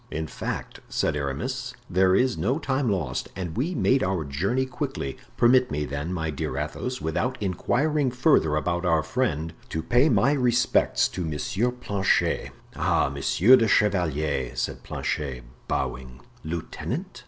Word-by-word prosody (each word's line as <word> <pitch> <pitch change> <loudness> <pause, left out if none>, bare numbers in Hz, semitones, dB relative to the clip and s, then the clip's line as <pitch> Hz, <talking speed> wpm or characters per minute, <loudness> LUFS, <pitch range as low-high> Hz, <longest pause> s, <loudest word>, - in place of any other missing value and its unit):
"In 80 +1 -3
fact," - - -5
said - - 0
Aramis, 120 - -3
"there 95 0 +3
is 125 +3 +2
no 105 - 0
time 135 -4 0
lost 80 -11 -2
and 90 -3 -5
we 160 +9 -1
made 130 +3 +3
our 90 -3 0
journey 95 - 0
quickly. 130 - -4 0.2
Permit 125 +1 +5
me, 75 0 -2
then, 70 +4 -4
my 80 -3 -2
dear 65 -2 -3
Athos, 125 - -3
without 125 +11 -1
inquiring 130 - +1
further 125 - +3
about 85 +3 -1
our 80 -3 +2
friend, 80 - -1 0.2
to 80 - -3
pay 125 - +4
my 135 -1 +4
respects 125 -4 +2
to 90 - -5
M. 95 +10 -1
Planchet." 100 -5 0 0.3
"Ah, - - +2
monsieur 115 +9 +5
le 115 -3 +3
chevalier," 80 - +1
said - - -3
Planchet, 65 -5 -3 0.2
bowing. 65 0 -3 0.2
"Lieutenant?" 80 +1 -5
95 Hz, 145 wpm, -25 LUFS, 75-125 Hz, 0.3 s, Permit